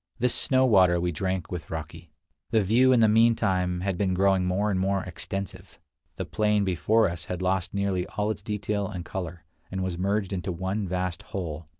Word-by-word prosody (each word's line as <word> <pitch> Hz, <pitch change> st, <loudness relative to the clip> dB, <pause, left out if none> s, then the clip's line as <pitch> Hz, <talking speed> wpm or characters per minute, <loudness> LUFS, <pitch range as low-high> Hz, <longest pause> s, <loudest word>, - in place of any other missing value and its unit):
This 125 Hz, 0 st, +1 dB
snow 130 Hz, -1 st, +3 dB
water 95 Hz, -7 st, +5 dB
we 90 Hz, 0 st, 0 dB
drank 95 Hz, +2 st, -3 dB
with 90 Hz, -2 st, -5 dB
raki. 80 Hz, +1 st, -7 dB, 0.4 s
The 110 Hz, -3 st, +3 dB
view 120 Hz, +7 st, +4 dB
in 125 Hz, -2 st, +5 dB
the 110 Hz, -, +6 dB
mean 115 Hz, +2 st, +5 dB
time 90 Hz, -4 st, 0 dB
had 95 Hz, -2 st, -2 dB
been 95 Hz, -3 st, +1 dB
growing 95 Hz, 0 st, +3 dB
more 100 Hz, +4 st, +1 dB
and 95 Hz, -, 0 dB
more 95 Hz, +1 st, 0 dB
extensive. 95 Hz, +2 st, -6 dB, 0.4 s
The -, -, -4 dB
plain 105 Hz, -1 st, +1 dB
before 105 Hz, +5 st, +2 dB
us 85 Hz, -1 st, -5 dB
had 90 Hz, 0 st, -4 dB
lost 95 Hz, -1 st, 0 dB
nearly 100 Hz, -2 st, 0 dB
all 105 Hz, +1 st, -1 dB
its 105 Hz, -, -6 dB
detail 105 Hz, -1 st, -2 dB
and 90 Hz, -2 st, -6 dB
color, 90 Hz, -2 st, -6 dB, 0.2 s
and 95 Hz, 0 st, -3 dB
was 90 Hz, -2 st, -3 dB
merged 100 Hz, +1 st, 0 dB
into 95 Hz, 0 st, -3 dB
one 95 Hz, +4 st, -2 dB
vast 90 Hz, -1 st, -2 dB
whole. 85 Hz, -5 st, -6 dB
95 Hz, 200 wpm, -26 LUFS, 90-105 Hz, 0.4 s, the